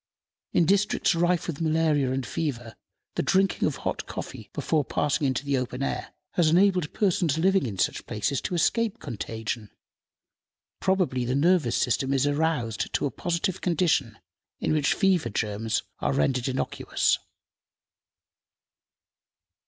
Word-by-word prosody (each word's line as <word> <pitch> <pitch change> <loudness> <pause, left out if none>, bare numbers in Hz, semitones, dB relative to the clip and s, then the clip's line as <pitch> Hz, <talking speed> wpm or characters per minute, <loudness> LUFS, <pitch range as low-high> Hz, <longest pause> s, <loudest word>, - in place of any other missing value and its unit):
In 170 - +3
districts 200 +2 +2
rife 175 +1 +1
with 170 -2 -4
malaria 155 -4 +2
and 130 -1 -2
fever, 120 -8 -3 0.4
the - - 0
drinking 190 +1 +2
of - - -2
hot - - -4
coffee - - -7
before 155 -2 0
passing 145 +1 0
into 130 +2 -1
the 140 -2 +1
open 125 +1 -4
air - - -3 0.2
has 170 -3 +3
enabled 180 -2 +3
persons 175 -6 +1
living 190 -3 +3
in 100 -4 -5
such - - -1
places 125 +6 -1
to 180 - -3
escape 225 +5 +1
contagion. 110 -3 -5 1.1
Probably 185 -10 +1
the 125 +2 -1
nervous 160 -4 +3
system 135 +2 +1
is 135 0 +2
aroused 145 -7 0
to - - +1
a 140 - -1
positive 175 +2 -2
condition, 155 - +1 0.4
in - - 0
which 150 -2 +2
fever 185 - +2
germs 110 +1 -1 0.2
are 70 - 0
rendered 120 - +1
innocuous. 130 0 0
145 Hz, 135 wpm, -26 LUFS, 125-175 Hz, 1.1 s, In